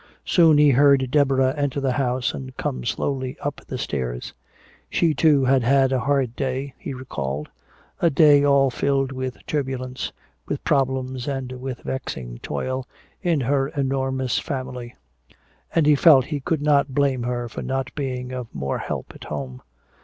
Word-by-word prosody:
Soon 165 Hz, -5 st, +5 dB
he 145 Hz, -1 st, +6 dB
heard 135 Hz, -1 st, +4 dB
Deborah 135 Hz, -2 st, +3 dB
enter 145 Hz, -1 st, -1 dB
the 135 Hz, -2 st, 0 dB
house 125 Hz, -2 st, 0 dB
and 130 Hz, -1 st, -8 dB
come 65 Hz, -1 st, -3 dB
slowly 130 Hz, 0 st, -2 dB
up 145 Hz, -1 st, -4 dB
the 130 Hz, -, -4 dB
stairs. 65 Hz, -, -4 dB, 0.6 s
She 165 Hz, -2 st, +2 dB
too 150 Hz, -4 st, +4 dB
had 130 Hz, 0 st, +4 dB
had 135 Hz, +2 st, +3 dB
a 130 Hz, -, +2 dB
hard 135 Hz, -3 st, 0 dB
day, 135 Hz, 0 st, -3 dB
he -, -, -6 dB
recalled, 75 Hz, -, -4 dB, 0.5 s
a 170 Hz, -, +4 dB
day 145 Hz, -1 st, +6 dB
all 140 Hz, -2 st, +4 dB
filled 135 Hz, +1 st, 0 dB
with 130 Hz, -1 st, -4 dB
turbulence, 130 Hz, -3 st, -3 dB, 0.4 s
with -, -, -3 dB
problems 130 Hz, -2 st, 0 dB
and 135 Hz, -2 st, -3 dB
with 130 Hz, 0 st, -6 dB
vexing 60 Hz, -, -5 dB
toil, 130 Hz, 0 st, -3 dB, 0.3 s
in 170 Hz, -6 st, +1 dB
her 135 Hz, +2 st, +1 dB
enormous 130 Hz, -3 st, -1 dB
family. 130 Hz, -4 st, -5 dB, 0.8 s
And 165 Hz, -3 st, +4 dB
he 150 Hz, -, +6 dB
felt 140 Hz, -3 st, +6 dB
he 150 Hz, -1 st, -3 dB
could 155 Hz, +1 st, -1 dB
not 140 Hz, -3 st, +2 dB
blame 140 Hz, -3 st, +2 dB
her 120 Hz, 0 st, -2 dB
for 115 Hz, -, -7 dB
not 135 Hz, -1 st, -3 dB
being 130 Hz, -3 st, -4 dB
of 125 Hz, -2 st, -5 dB
more 70 Hz, 0 st, -2 dB
help -, -, -5 dB
at -, -, -12 dB
home. 65 Hz, -4 st, -6 dB
130 Hz, 160 wpm, -23 LUFS, 125-140 Hz, 0.8 s, he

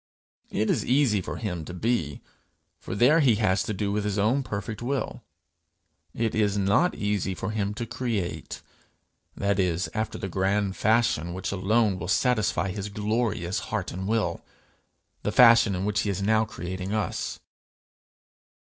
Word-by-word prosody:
It 110 Hz, -, 0 dB
is -, -, 0 dB
easy 125 Hz, -6 st, +2 dB
for -, -, -5 dB
him 90 Hz, -8 st, -4 dB
to 90 Hz, -, -7 dB
be, 90 Hz, -, -1 dB, 0.6 s
for -, -, -6 dB
there 130 Hz, +10 st, +5 dB
he 130 Hz, -7 st, +4 dB
has 105 Hz, -3 st, +2 dB
to 115 Hz, -, -3 dB
do 100 Hz, 0 st, -2 dB
with 105 Hz, 0 st, -1 dB
his 105 Hz, -1 st, -1 dB
own 110 Hz, +7 st, +2 dB
perfect 105 Hz, -2 st, -5 dB
will: 135 Hz, +2 st, -2 dB, 0.9 s
it 115 Hz, -1 st, 0 dB
is 105 Hz, -2 st, +1 dB
not 100 Hz, -, +2 dB
easy 105 Hz, -2 st, -1 dB
for 95 Hz, -, -4 dB
him 105 Hz, -1 st, -2 dB
to 120 Hz, -, -3 dB
create 110 Hz, -7 st, -4 dB, 0.7 s
that 100 Hz, 0 st, 0 dB
is, 85 Hz, -3 st, 0 dB
after 110 Hz, 0 st, -2 dB
the -, -, -4 dB
grand 95 Hz, +1 st, 0 dB
fashion 110 Hz, -7 st, +1 dB
which 95 Hz, 0 st, -3 dB
alone 100 Hz, +1 st, +1 dB
will 90 Hz, -, -5 dB
satisfy 105 Hz, -4 st, +1 dB
his 100 Hz, +1 st, -5 dB
glorious 105 Hz, -3 st, -1 dB
heart -, -, -2 dB
and 95 Hz, +2 st, -5 dB
will, 110 Hz, 0 st, 0 dB, 0.8 s
the -, -, -1 dB
fashion 115 Hz, -4 st, +6 dB
in 90 Hz, +2 st, -2 dB
which 105 Hz, 0 st, 0 dB
he 105 Hz, -, 0 dB
is 100 Hz, -1 st, -1 dB
now 110 Hz, +2 st, +3 dB
creating 95 Hz, 0 st, -5 dB
us. 105 Hz, -2 st, -2 dB
105 Hz, 160 wpm, -26 LUFS, 95-110 Hz, 0.9 s, fashion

